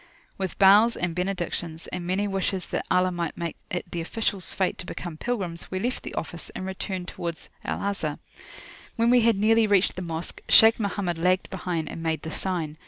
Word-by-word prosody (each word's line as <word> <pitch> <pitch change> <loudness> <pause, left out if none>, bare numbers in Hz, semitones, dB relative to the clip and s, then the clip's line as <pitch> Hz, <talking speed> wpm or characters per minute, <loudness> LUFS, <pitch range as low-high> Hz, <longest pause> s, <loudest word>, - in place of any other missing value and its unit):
With 190 -2 -4
bows, 205 +4 +6
and 175 -1 -1
benedictions, 175 -3 -3
and 180 -1 -5
many 195 +3 +1
wishes 195 -1 -1
that - - -1
Allah 185 0 +3
might 170 -3 -3
make 170 -2 -3
it 175 - -4
the 170 - -2
officials' 195 0 -1
fate 190 - 0
to 175 - -7
become 175 -2 -5
pilgrims, 180 -4 -3
we 185 - -3
left 245 +7 -1
the - - -7
office, 170 +1 -4
and 185 - -4
returned 190 -1 -4
towards 170 -2 -5
Al - - -3
Azhar. 195 -7 -2 0.8
When 230 0 +3
we 250 -1 +6
had 230 -1 +4
nearly 220 +2 +4
reached 200 -2 +3
the 185 - -4
Mosque, 165 -1 -4
Shaykh 225 +1 +8
Mohammed 195 -5 -1
lagged 185 +2 +2
behind, 175 -4 -2
and 165 - -6
made 160 -1 -1
the 160 - -5
sign. 165 -4 -2
185 Hz, 195 wpm, -26 LUFS, 170-200 Hz, 0.8 s, Shaykh